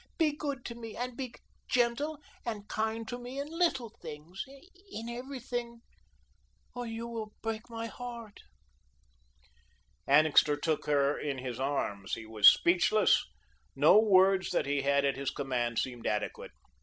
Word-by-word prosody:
Be 310 -3 +2
good 280 -4 -4
to 235 - -5
me 230 -2 -8
and 245 0 -4
be 255 -2 -5 0.4
gentle 250 +5 +1 0.3
and 210 -3 -5
kind 220 +1 -2
to 245 +2 -5
me 250 +3 -7
in 285 - -3
LITTLE 265 -10 +1
things, 160 +3 -7 0.5
in 225 +1 -6
everything, 240 -1 -5 0.9
or 245 -1 -5
you 225 +1 -5
will 220 -2 -6
break 225 +1 -4
my 230 0 -5
heart." 235 -3 -8 1.7
Annixter 150 0 +5
took 155 +1 -1
her 145 -1 +2
in 140 -2 -3
his 125 -2 -5
arms. 105 -8 -2
He 110 - -9
was 110 -2 +5
speechless. 180 +5 +4 0.5
No - - +7
words 190 -3 +4
that - - 0
he 140 0 0
had 140 0 +2
at 140 -1 +1
his 140 -1 -1
command 120 -4 -2
seemed 120 -3 -2
adequate. 105 - -2
215 Hz, 145 wpm, -31 LUFS, 145-240 Hz, 1.7 s, No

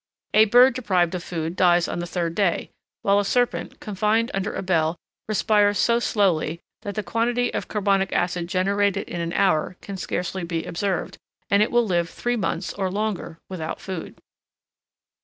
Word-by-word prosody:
A 215 +1 +7
bird 245 +4 +6
deprived 185 -8 +1
of 180 -2 -3
food 165 -1 -4
dies 175 -2 +4
on 175 - -3
the 175 - -3
third 170 -2 -2
day, 185 -2 0 0.3
while 200 0 +4
a - - +1
serpent, 245 +4 0
confined 215 +3 0
under 195 +1 -1
a - - -4
bell, 165 -3 +1 0.3
respires 205 -1 +3
so 235 0 +3
slowly 175 -8 +1 0.2
that 200 - -5
the 215 - -2
quantity 240 +3 0
of - - -3
carbonic 195 -2 +1
acid 175 -1 0
generated 200 +2 +1
in 170 - -4
an 170 0 -2
hour 180 -2 +1
can 200 -1 -7
scarcely 180 0 -3
be 170 -1 -3
observed, 190 +2 -2 0.3
and 200 +1 +5
it 215 - +3
will 240 -1 +3
live 170 -4 0
three 245 0 -2
months, 190 -4 -2
or 190 -2 -2
longer, 200 -4 -3
without 165 -4 -5
food. 185 -4 -6
195 Hz, 175 wpm, -24 LUFS, 175-210 Hz, 0.3 s, A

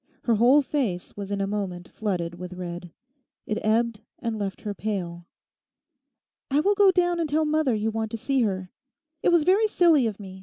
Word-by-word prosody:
Her 235 - +2
whole 255 +6 +5
face 240 -12 -2
was 200 -1 -6
in 200 -1 -2
a - - +1
moment 195 -3 -4
flooded 180 -6 -3
with 180 +1 -8
red. 175 -1 -6 0.6
It 215 - -2
ebbed 225 0 +1 0.2
and 225 -2 -3
left 195 -2 -4
her 210 -2 -4
pale. 175 -5 -4 1.2
'I 280 +2 +3
will 405 +6 +3
go 405 -1 +5
down 350 -2 +2
and 325 -2 -1
tell 310 +2 +2
mother 305 -5 +1
you 215 +1 -1
want 220 0 -2
to 230 - -4
see 270 +3 0
her. 190 -4 -2 0.5
It - - +3
was 340 -3 +4
very 390 +6 +4
silly 330 - +4
of 215 -2 -5
me. 190 -2 -10
220 Hz, 195 wpm, -25 LUFS, 190-295 Hz, 1.2 s, whole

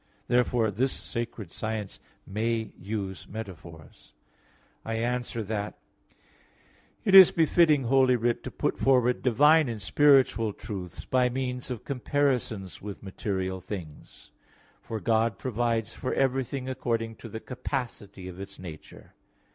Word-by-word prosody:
Therefore 120 -2 +2
this 130 +6 0
sacred 115 -6 -5
science 110 -2 -4 0.3
may 110 +2 -1
use 100 -1 -5
metaphors. 85 -7 -10 0.7
I 115 - -3
answer 120 0 -2
that, 105 0 -4 1.3
It 195 - +2
is 190 -2 +12
befitting 160 -3 +4
Holy 130 +1 +4
Writ 120 0 0
to - - -3
put - - -2
forward 125 -2 +3
divine 150 +4 +5
and 115 -2 -4
spiritual 120 +1 +4
truths 95 -6 -7
by 125 -1 +2
means 125 0 -3
of 125 -4 -5
comparisons 125 -7 -1
with 100 -1 -8
material 95 -1 -3
things. 90 -5 -9 0.5
For 110 - -5
God 115 -2 +1
provides 115 -2 -1
for 130 - -3
everything 135 0 0
according 115 -3 -2
to 115 - -10
the 110 - -6
capacity 115 -7 -5
of 90 0 -9
its 100 0 -8
nature. 85 -4 -11
115 Hz, 125 wpm, -28 LUFS, 100-130 Hz, 1.3 s, is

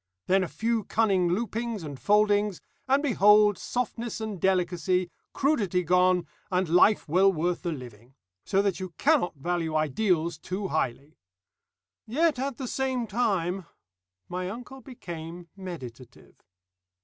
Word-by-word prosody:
Then 190 0 +3
a - - -2
few 225 +4 -1
cunning 195 -5 +2
loopings 225 +1 -2
and 145 -2 -6
foldings, 210 -2 +2 0.3
and 275 +2 +3
behold 210 - +5
softness 240 -1 -3
and 215 -5 -5
delicacy, 180 -1 +1 0.2
crudity 205 - +1
gone, 180 +1 +3 0.2
and 185 -1 +1
life 180 +5 +4
well 185 +5 +4
worth 175 0 -1
the 175 - -2
living. 125 -3 -10 0.3
So 195 +1 +1
that 195 -2 0
you 185 -3 -7
cannot 285 - +2
value 165 +2 -2
ideals 160 +1 +1
too 190 +3 -4
highly. 140 0 -3 0.9
"Yet 295 +4 +1
at 270 -1 -3
the 265 - -5
same 260 -1 -1
time 195 -5 -1 0.3
" 90 0 -59
My 180 +1 -4
uncle 250 +5 -9
became 170 - -9
meditative. 135 -11 -10
185 Hz, 135 wpm, -27 LUFS, 170-220 Hz, 0.9 s, behold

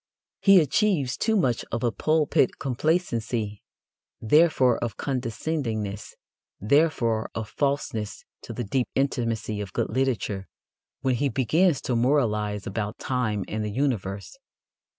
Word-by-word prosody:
He 195 -2 +7
achieves 155 - +1
too 220 -1 +1
much 125 - +1
of 115 - -2
a 120 - +2
pulpit 155 -1 +2
complacency 120 - -1 0.6
therefore 130 -1 +4
of 115 -3 -3
condescendingness 115 -5 -3 0.4
therefore 115 -2 +2
of 110 -1 -4
falseness 135 -7 -2 0.2
to - - -9
the 120 - -4
deep 125 +4 0
intimacy 115 -6 -1
of 100 -3 -7
good - - -1
literature 110 -6 -1 0.5
when 130 -1 +1
he 140 +3 +1
begins 150 +5 +2
to 125 - -1
moralize 105 -5 +1
about 105 +3 -3
time 110 -6 -1
and 110 0 -3
the 105 - -2
universe. 105 - -2
120 Hz, 125 wpm, -26 LUFS, 110-140 Hz, 0.6 s, He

